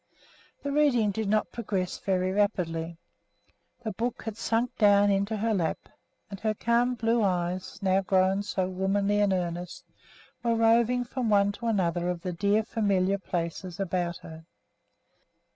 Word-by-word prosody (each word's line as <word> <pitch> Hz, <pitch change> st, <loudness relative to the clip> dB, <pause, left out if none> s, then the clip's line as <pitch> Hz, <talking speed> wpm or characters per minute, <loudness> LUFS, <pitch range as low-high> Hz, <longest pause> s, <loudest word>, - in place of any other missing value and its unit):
The 285 Hz, -, -2 dB
reading 275 Hz, -8 st, +3 dB
did 220 Hz, 0 st, -3 dB
not 215 Hz, +1 st, +1 dB
progress 195 Hz, -6 st, -3 dB
very 185 Hz, -1 st, 0 dB
rapidly. 170 Hz, -5 st, -1 dB, 0.9 s
The 220 Hz, -, -2 dB
book 235 Hz, +4 st, -3 dB
had 220 Hz, -2 st, -5 dB
sunk 230 Hz, +2 st, -1 dB
down 205 Hz, -1 st, +5 dB
into 200 Hz, +2 st, 0 dB
her 220 Hz, +2 st, 0 dB
lap, 170 Hz, -6 st, 0 dB, 0.5 s
and 195 Hz, -, -7 dB
her 215 Hz, +1 st, -1 dB
calm 240 Hz, +3 st, +1 dB
blue 230 Hz, 0 st, +1 dB
eyes, 180 Hz, -1 st, -1 dB
now 190 Hz, 0 st, +3 dB
grown 190 Hz, +1 st, +2 dB
so 190 Hz, -2 st, -2 dB
womanly 195 Hz, +2 st, 0 dB
and 205 Hz, -1 st, +3 dB
earnest, 175 Hz, -1 st, -3 dB, 0.6 s
were 235 Hz, -1 st, +1 dB
roving 230 Hz, +2 st, +3 dB
from 245 Hz, -1 st, -3 dB
one 200 Hz, -1 st, +4 dB
to 230 Hz, +3 st, -6 dB
another 175 Hz, -5 st, 0 dB
of 175 Hz, -1 st, -3 dB
the 180 Hz, -1 st, -4 dB
dear 200 Hz, +5 st, +2 dB
familiar 200 Hz, -3 st, +1 dB
places 175 Hz, +1 st, -4 dB
about 175 Hz, -2 st, -1 dB
her. 160 Hz, 0 st, -11 dB
200 Hz, 150 wpm, -27 LUFS, 185-225 Hz, 0.9 s, down